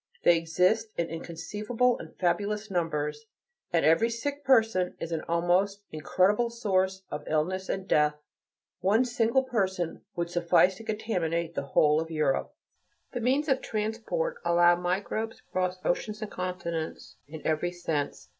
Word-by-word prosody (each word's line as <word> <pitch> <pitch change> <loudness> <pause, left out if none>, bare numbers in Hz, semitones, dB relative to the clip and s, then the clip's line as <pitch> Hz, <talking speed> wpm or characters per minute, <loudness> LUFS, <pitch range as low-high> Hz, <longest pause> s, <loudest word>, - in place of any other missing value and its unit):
They 175 - +6
exist 180 +7 +2
in 170 -1 -1
inconceivable 210 +9 -1
and - - -11
fabulous 205 +3 0
numbers; 165 +3 -2 0.4
and 170 -2 +2
every 165 +9 +4
sick 285 +5 -4
person 225 -9 +3
is 165 - -5
an 160 -1 -1
almost 180 +4 +1
incredible 190 +9 +2
source 190 -5 0
of 150 - -4
illness 185 +5 -1
and 195 0 -3
death. 150 -3 +3 0.6
One 205 +7 +3
single 240 +1 +2
person 190 -9 -1
would 170 0 -2
suffice 175 +2 +3
to 225 - -10
contaminate 175 -7 -2
the - - -2 0.2
whole 150 +1 +5
of 165 - -6
Europe. 155 -4 0 0.6
The 245 - -4
means 270 +6 +2
of 265 -2 +2
transport 230 - -2
allow 175 0 +5
microbes 195 +5 -2
to - - -24
cross 185 -1 0
oceans 210 +4 -1
and 215 - -6
continents 175 -3 -4
in 155 +1 -10
every 160 +3 0
sense. 160 -5 -3
185 Hz, 145 wpm, -28 LUFS, 170-220 Hz, 0.6 s, They